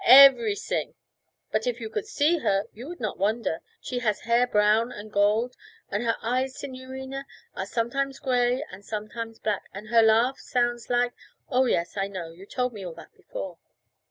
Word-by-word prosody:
'Everysing! 275 - +6 0.6
But - - 0
if - - -1
you - - -4
could 430 -1 -4
see 330 -3 +2
her 195 -6 +1
you 240 +5 -9
would 350 +2 -7
not 215 -6 -3
wonder. 210 -4 0 0.2
She 250 - -3
has 215 -4 0
hair 235 +2 +3
brown 215 +2 +3
and 210 +1 -9
gold, 215 +5 +2 0.4
and 205 - 0
her 230 -1 +1
eyes, 255 +3 0
signorina, 265 +1 -6 0.3
are 190 - -3
sometimes 270 +5 -1
grey 250 +1 +1
and 190 +2 -10
sometimes 220 +2 -5
black, 210 -2 -2
and 210 +2 -8
her 230 0 +6
laugh 230 +4 +4
sounds 240 -1 -1
like 245 0 +2 0.2
' - - -44
'Oh, 260 0 +4
yes, 170 -5 0
I 195 0 +1
know; 180 -4 -6
you 185 +4 -13
told 250 +1 -1
me 205 -3 -7
all 175 -3 -6
that - - -13
before.' - - -7
235 Hz, 185 wpm, -26 LUFS, 210-260 Hz, 0.6 s, Everysing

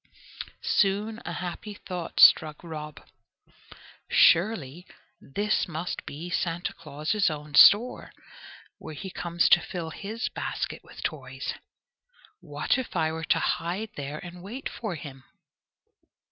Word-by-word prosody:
Soon 210 +3 +1
a 175 - -4
happy 185 +4 -6
thought 180 -4 -6
struck 155 0 +6
Rob. 155 -3 -8 1.0
"Surely 175 -4 +3 0.3
this 205 +10 -1
must 170 +1 -5
be 155 +5 -6
Santa 175 -1 -1
Claus's 155 +8 -1
own 150 -1 -7
store, 220 - +6 0.7
where 155 - -8
he 190 +5 -7
comes 170 -1 +1
to 175 - +7
fill 165 -3 -5
his 215 +8 -4
basket - - -4
with - - -12
toys! - - -4 0.9
What 150 - -1
if 255 - -6
I 160 -2 +1
were 160 0 -4
to - - +3
hide 190 +6 -2
there 145 +1 -5
and 175 +2 -9
wait 230 +9 -6
for 215 -6 -5
him?" 135 -3 -9
175 Hz, 125 wpm, -27 LUFS, 155-200 Hz, 1.0 s, to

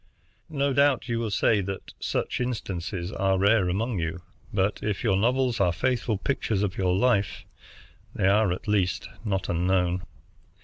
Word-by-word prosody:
No 140 -2 0
doubt 140 -3 +3
you 115 -1 -1
will 115 -2 -2
say 105 +1 +2
that 95 0 -6
such - - -2
instances 95 -6 -3
are 95 -2 +1
rare 100 -1 +3
among 105 +3 -1
you, 85 +2 -3 0.3
but 100 +1 0
if 105 -3 -2
your 95 - +3
novels 125 +3 +1
are 90 -3 +3
faithful 120 +3 0
pictures 105 -3 -1
of 100 -2 -1
your 90 -1 +1
life, 105 -3 +1 0.7
they - - 0
are 100 0 +4
at 90 - -5
least 100 -4 +1 0.2
not 95 -3 -1
unknown. 90 +1 +1
100 Hz, 160 wpm, -26 LUFS, 95-115 Hz, 0.7 s, are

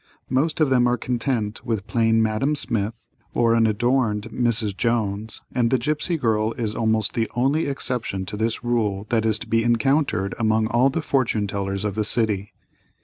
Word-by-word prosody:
Most 150 +5 +1
of 150 -4 +2
them 125 -1 +4
are 120 0 +1
content 120 -4 -2
with 110 -4 -2
plain 115 -1 +2
"Madame" 110 +7 0
Smith, 115 -4 -3 0.3
or 115 -1 +3
unadorned 115 -1 +1
"Mrs." 115 -4 +1
Jones, 110 -2 -1
and 120 -2 +2
"The 130 - +3
Gipsy 150 +7 -1
Girl" 110 -4 0
is 110 -3 -3
almost 110 -1 +1
the 115 -1 -1
only 135 +6 +1
exception 125 -8 -2
to 100 - -6
this 110 +2 -2
rule 110 -5 0
that 110 -2 +2
is 110 -1 +2
to - - -8
be 115 0 +2
encountered 120 -3 +1
among 110 -1 +2
all 120 +4 +3
the 155 +4 -3
fortune 125 -7 +1
tellers 100 0 -3
of 105 - -1
the 110 +2 -1
city. 105 -3 +1
115 Hz, 175 wpm, -23 LUFS, 110-125 Hz, 0.3 s, them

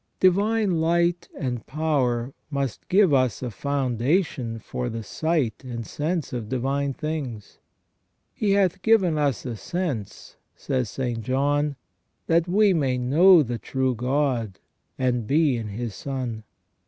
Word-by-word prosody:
Divine 200 -1 +3
light 170 +1 +1
and 125 -4 -3
power 135 -5 0 0.2
must 140 -5 -3
give 190 -4 +5
us 130 -2 +2
a 125 - -3
foundation 130 - -1
for 125 +2 -4
the 115 -1 -5
sight 150 -2 -1
and 120 -3 -5
sense 155 +2 -2
of 115 -4 -4
divine 135 +2 -1
things. 135 -7 -5 0.7
"He 205 -2 +1
hath 195 -1 +2
given 185 -7 +3
us 140 -5 0
a 120 -3 -3
sense," 145 - -4 0.2
says 130 -5 -2
St. 120 0 -3
John, 145 +4 0 0.3
" - - -49
that 165 +1 +2
we 200 +2 +4
may 135 -6 +1
know 160 +8 +6
the 120 -2 -4
true 130 -1 -1
God, 125 -4 -1 0.4
and 125 -4 0
be 150 -2 +3
in 115 -2 -4
His 110 +2 -4
Son." 125 -3 -5
135 Hz, 140 wpm, -25 LUFS, 120-165 Hz, 0.7 s, know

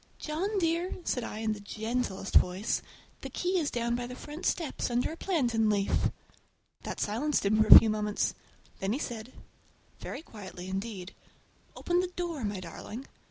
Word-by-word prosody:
"John 370 +8 -2
dear!" 340 0 +1
said 250 - -1
I 215 - -5
in 220 -1 +1
the 210 - -7
gentlest 215 -1 -3
voice, 185 +5 +3 0.4
"the - - -5
key 365 +1 0
is 300 -3 0
down 235 0 -1
by 240 0 -3
the 250 - -7
front 295 +5 -5
steps, 320 -6 -1
under 245 +3 +1
a - - -5
plantain 240 - +1
leaf!" 200 -2 +2 0.7
That - - -5
silenced 240 +5 0
him 215 +2 +4
for 215 - +4
a - - +14
few 225 - +5
moments. 210 -1 0 0.5
Then 195 +2 0
he - - 0
said—very 240 +5 -9
quietly 190 - -9
indeed, 195 -1 -4 0.6
"Open 350 0 +1
the 365 - +1
door, 345 -6 -4
my 205 -2 -2
darling!" 210 +8 -7
235 Hz, 165 wpm, -30 LUFS, 210-305 Hz, 0.7 s, a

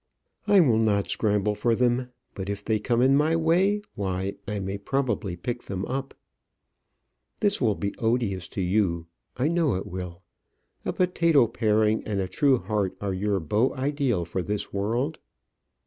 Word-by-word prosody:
I 200 -2 +7
will 120 -9 +3
not 105 -3 +1
scramble 105 -1 +1
for 115 +3 +1
them; 125 +1 +1 0.2
but 95 0 -5
if 100 0 -4
they 110 -1 +1
come 120 +2 +1
in 135 +1 +5
my 155 +3 +3
way, 180 +6 +2
why, 95 0 -2
I 105 0 -2
may 95 +1 -4
probably 115 -5 -1
pick 120 +8 -5
them 95 -1 -3
up. 135 +1 -4 1.2
This 205 -6 +1
will 110 -5 +2
be 100 0 -3
odious 110 -6 0
to - - +1
you. 90 -3 +1 0.3
I 130 +3 +1
know 165 - +2
it 95 - -3
will. 90 0 -7 0.6
A - - 0
potato 170 -6 +3
paring 110 -1 +1
and 105 -2 -2
a 95 - -1
true 140 - +3
heart 100 -2 -2
are 100 -2 -2
your 100 +1 0
beau 105 - +1
ideal 130 - 0
for 90 +3 -3
this 105 +2 -3
world. 120 +10 -1
110 Hz, 165 wpm, -26 LUFS, 100-135 Hz, 1.2 s, I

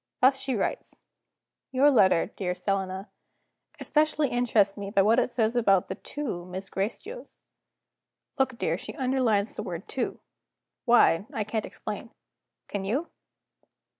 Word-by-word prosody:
Thus 265 +1 +5
she 265 -1 -2
writes: 200 - -2 0.8
"'Your 270 +3 +5
letter, 195 -6 +4
dear 180 -2 -2
Selina, 190 +1 -2 0.7
especially 305 -2 +1
interests 225 -5 +2
me 200 -1 -5
by 200 -1 +3
what 225 +4 +4
it 250 - +1
says 230 -1 0
about 195 -6 +3
the - - -1
two 220 -4 -5
Miss 185 +2 -7
Gracedieus. 310 - -5 0.5
' - - -36
Look, 260 -2 +1
dear; 165 -4 -1
she 215 - -8
underlines 250 -6 +1
the - - -3
word 175 +2 -6
Two. 260 - -3 0.7
Why, 225 -6 +5
I 215 - -2
can't 215 +1 -3
explain. - - -6 0.6
Can 200 -1 -4
you? 260 - -1
220 Hz, 140 wpm, -27 LUFS, 195-255 Hz, 0.8 s, Thus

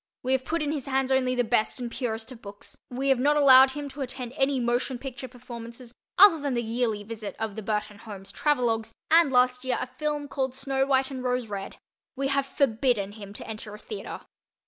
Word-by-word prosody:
We 255 - -1
have 260 0 +1
put 330 +1 -1
in 295 - -1
his 290 -4 -4
hands 270 0 0
only 255 -1 +2
the 245 - +2
best 225 +1 +1
and 240 -1 -4
purest 230 -1 -3
of 240 -2 -11
books; 200 -1 -10
we 265 +2 -1
have 265 -2 +4
not 295 +3 +3
allowed 265 -2 +8
him 290 0 -5
to 275 +1 -8
attend 255 -2 -4
any 270 0 +2
motion 245 +2 0
picture 260 0 -7
performances 240 -1 -10 0.2
other 380 -4 +8
than 280 -3 -1
the 240 - 0
yearly 225 -2 -1
visit 215 -2 -6
of 220 -2 -3
the 220 - -5
Burton 210 0 -3
Holmes 200 -3 -10
travelogues, 235 -6 +1 0.2
and, 325 -3 +6
last 250 0 +3
year, 260 -1 0
a - - -2
film 295 +2 -3
called 265 -2 -2
Snow 270 0 0
White 265 0 +2
and 260 -2 -5
Rose 250 -2 -1
Red; 195 -1 -5 0.4
we 275 0 -1
have 275 0 +1
forbidden 240 -6 +1
him 205 -2 -10
to 205 - -9
enter 215 -1 -7
a - - -9
theater. 420 - -7
255 Hz, 215 wpm, -27 LUFS, 225-270 Hz, 0.4 s, allowed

